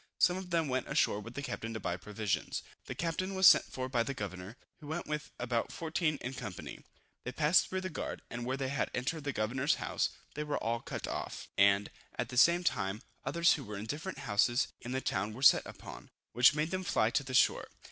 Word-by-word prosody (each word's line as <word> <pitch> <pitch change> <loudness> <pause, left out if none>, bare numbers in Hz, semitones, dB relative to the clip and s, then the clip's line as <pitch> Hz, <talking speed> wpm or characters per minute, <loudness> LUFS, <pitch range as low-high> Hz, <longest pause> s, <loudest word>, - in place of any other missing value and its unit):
Some 180 - +4
of 185 -1 -6
them 165 -3 +1
went 130 -1 -1
ashore 100 - +2
with 115 +3 -9
the 140 - -4
captain 115 -4 -4
to - - -3
buy 85 - -2
provisions. 100 -2 -2 0.2
The - - -6
captain 185 +3 -2
was 190 0 +4
sent - - +9
for 130 0 -5
by 125 -2 +1
the 130 +4 -2
governor, 100 +1 -6 0.2
who 150 - -11
went 160 +3 -3
with 150 0 -4
about 120 -1 -1
14 165 -2 -1
in 125 - -4
company. 110 -8 -7 0.4
They 125 - -4
passed 150 +6 +4
through 185 0 -2
the 185 - -3
guard, - - -5
and 120 0 -5
when 130 +2 -2
they 135 -1 -2
had 140 - -1
entered 145 +4 -2
the 140 - 0
governor's 130 +5 +1
house, - - -1 0.2
they 150 - -3
were 150 -1 -2
all 115 +1 -1
cut - - -5
off; - - -5
and, 100 0 +4 0.3
at - - -2
the 125 - -5
same 170 +6 +6
time, 105 - -1 0.2
others 170 0 +4
who 145 - -4
were 105 -3 -6
in 100 - -5
different 155 - -4
houses 120 -1 +2
of 125 - -5
the 130 +1 -1
town 105 -1 -1
were 130 - -7
set - - +7
upon, - - -10 0.2
which 125 +4 +6
made 155 +2 0
them 185 0 -2
fly 115 -10 +2
to - - +2
the 130 -1 -4
shore. - - +4
130 Hz, 230 wpm, -32 LUFS, 110-155 Hz, 0.4 s, sent